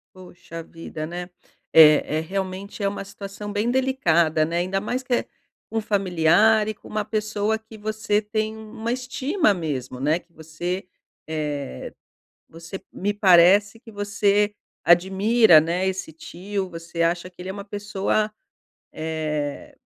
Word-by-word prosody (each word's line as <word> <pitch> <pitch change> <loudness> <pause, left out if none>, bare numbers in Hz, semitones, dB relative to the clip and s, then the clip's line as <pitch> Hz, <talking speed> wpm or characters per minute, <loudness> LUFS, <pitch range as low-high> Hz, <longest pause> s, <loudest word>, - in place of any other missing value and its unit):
Poxa 175 -2 -10
vida, 165 -1 -7
né? 175 +2 -6 0.4
É 155 -1 +7
é - - +1
realmente 190 +3 -5
é - - +3
uma 195 0 -3
situação 200 +1 -8
bem 210 +3 0
delicada, 170 -12 +2
né? 170 +2 -2
Ainda 185 +2 0
mais 250 +5 -3
que 250 - -2
é - - +1 0.5
um 225 -1 0
familiar 205 +2 +3
e 215 - -2
com - - -17
uma 215 0 -2
pessoa 215 0 -1
que 220 0 -14
você 215 0 -1
tem 215 +1 -2
um 220 -1 -11
uma 230 0 -3
estima 260 - 0
mesmo, 135 -7 -4
né, 150 +4 +2
que 175 - -29
você, 175 +4 -5 0.4
eh, 150 - -4 0.6
você 165 +3 -8
m-me 205 +2 -2
parece 200 +2 +5
que 225 - -14
você 205 0 +1 0.3
admira, 190 +1 +5
né, 175 +4 -1
esse 190 -4 -3
tio, 190 +4 -5
você 170 0 -3
acha 175 +2 0
que 180 - -36
ele 185 +1 -6
é - - -1
uma 200 0 -7
pessoa, 205 +1 -1 0.6
eh, 155 -2 -4
195 Hz, 150 wpm, -23 LUFS, 165-215 Hz, 0.6 s, É